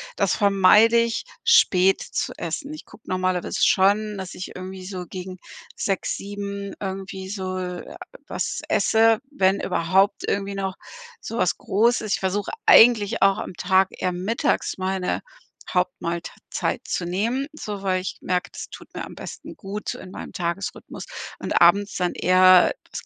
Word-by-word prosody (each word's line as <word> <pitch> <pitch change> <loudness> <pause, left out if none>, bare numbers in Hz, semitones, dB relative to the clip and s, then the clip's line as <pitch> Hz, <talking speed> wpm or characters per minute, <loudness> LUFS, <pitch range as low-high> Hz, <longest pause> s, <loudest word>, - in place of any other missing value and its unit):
das 200 -3 +1
vermeide 205 +3 +5
ich, 230 - 0 0.2
spät 195 - +5
zu - - -3
essen. 295 0 -4
Ich 310 - -10
guck - - -17
normalerweise 185 -1 -1
schon, 205 +2 +3
dass 190 -1 -6
ich 180 - -8
irgendwie 185 0 -8
so 185 -1 -5
gegen 185 0 -7 0.4
18:00 195 -2 -1
19:00 200 0 -6
irgendwie 190 -1 -5
so 185 -2 -4
j 180 -1 -6 0.3
was - - -3
esse, 225 0 +4
wenn 195 -9 +2
überhaupt 190 +4 +1
irgendwie 200 0 -2
noch 190 -1 -3 0.4
so 230 - -6
was 185 - +1
Großes. 220 0 +1
Ich - - 0
versuche 195 +2 -1
eigentlich 225 -2 +6
auch 195 0 +5
am - - -6
Tag 190 +2 +3
eher 180 - -2
mittags 190 +7 -1
meine 190 -1 -1 0.5
Hauptmahlt 180 -2 -1 0.2
zeit - - -2
zu 175 - -2
nehmen, 230 +10 -1
so 210 -9 -6
weil 185 -1 +1
ich 185 - -5
merke, 180 -1 -1
das - - -8
tut - - -13
mir - - -5
am - - -11
besten - - -9
gut 205 0 -5
in 185 - -10
meinem - - -8
Tagesrhythmus, 175 +2 -4 0.3
und - - 0
abends 205 0 +5
dann 180 -1 0
eher 185 0 +5 0.2
was - - -7
195 Hz, 155 wpm, -23 LUFS, 185-205 Hz, 0.5 s, eigentlich